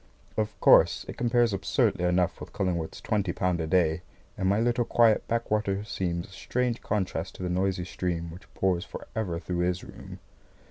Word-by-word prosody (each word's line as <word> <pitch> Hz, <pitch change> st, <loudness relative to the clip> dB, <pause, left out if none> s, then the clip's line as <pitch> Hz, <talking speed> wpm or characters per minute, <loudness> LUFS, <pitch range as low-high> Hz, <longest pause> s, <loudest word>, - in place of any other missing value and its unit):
Of 105 Hz, -1 st, -2 dB
course, -, -, +5 dB
it -, -, -6 dB
compares 120 Hz, -2 st, +2 dB
absurdly 95 Hz, -2 st, +1 dB
enough 90 Hz, 0 st, +1 dB
with -, -, -9 dB
Cullingworth's 85 Hz, -4 st, -2 dB
twenty 100 Hz, -5 st, 0 dB
pound 90 Hz, -2 st, 0 dB
a 80 Hz, -, -2 dB
day, 85 Hz, -1 st, +2 dB, 0.3 s
and 95 Hz, -, 0 dB
my 100 Hz, +2 st, +3 dB
little 120 Hz, +1 st, +2 dB
quiet 115 Hz, -1 st, +3 dB
back 115 Hz, -1 st, -1 dB
water 100 Hz, -2 st, 0 dB
seems 85 Hz, -5 st, -2 dB
a -, -, -18 dB
strange 120 Hz, +4 st, -2 dB
contrast 100 Hz, -3 st, -2 dB
to -, -, -7 dB
the 90 Hz, -, -1 dB
noisy 90 Hz, 0 st, 0 dB
stream 85 Hz, -3 st, -3 dB
which 90 Hz, +3 st, -13 dB
pours 90 Hz, -2 st, +1 dB
for -, -, -9 dB
ever 90 Hz, -7 st, -2 dB
through 90 Hz, +1 st, -3 dB
his 90 Hz, +1 st, 0 dB
room. -, -, -10 dB
95 Hz, 185 wpm, -28 LUFS, 90-105 Hz, 0.3 s, course